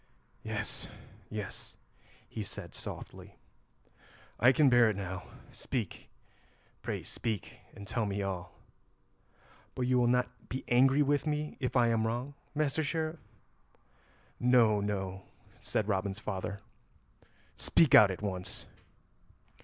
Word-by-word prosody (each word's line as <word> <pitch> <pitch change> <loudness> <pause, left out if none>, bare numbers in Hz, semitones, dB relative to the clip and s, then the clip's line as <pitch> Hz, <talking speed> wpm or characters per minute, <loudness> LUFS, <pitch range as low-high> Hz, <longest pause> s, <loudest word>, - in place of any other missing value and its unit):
"Yes, - - -4 0.4
yes," 105 -3 -7 0.5
he - - -5
said - - -7
softly, - - -8 1.0
"I 125 +2 +7
can 145 +2 +4
bear 120 -3 +6
it 105 - -1
now. 95 -1 -4 0.3
Speak, - - -4 0.7
pray - - -3
speak, 110 -5 -4 0.2
and 100 0 -9
tell 110 0 0
me 100 0 -2
all." 90 -2 -4 1.2
"But 130 - -1
you 125 0 +3
will 120 - +4
not 125 0 0
be 130 - -4
angry 135 +4 +5
with 145 +2 +1
me 150 0 -1
if 125 -1 -2
I 120 -2 +5
am 110 -1 +2
wrong, 120 +5 -3 0.2
Master 155 +1 +1
Sheriff?" 160 +2 -2 1.2
"No, 120 -4 +5
no," 95 -2 -2 0.4
said 105 - -1
Robin's 95 -1 0
father; 100 -1 -4 0.9
"speak 160 -5 +3
out 105 - +10
at 95 +2 -5
once." 95 -2 -4
115 Hz, 120 wpm, -32 LUFS, 100-130 Hz, 1.2 s, out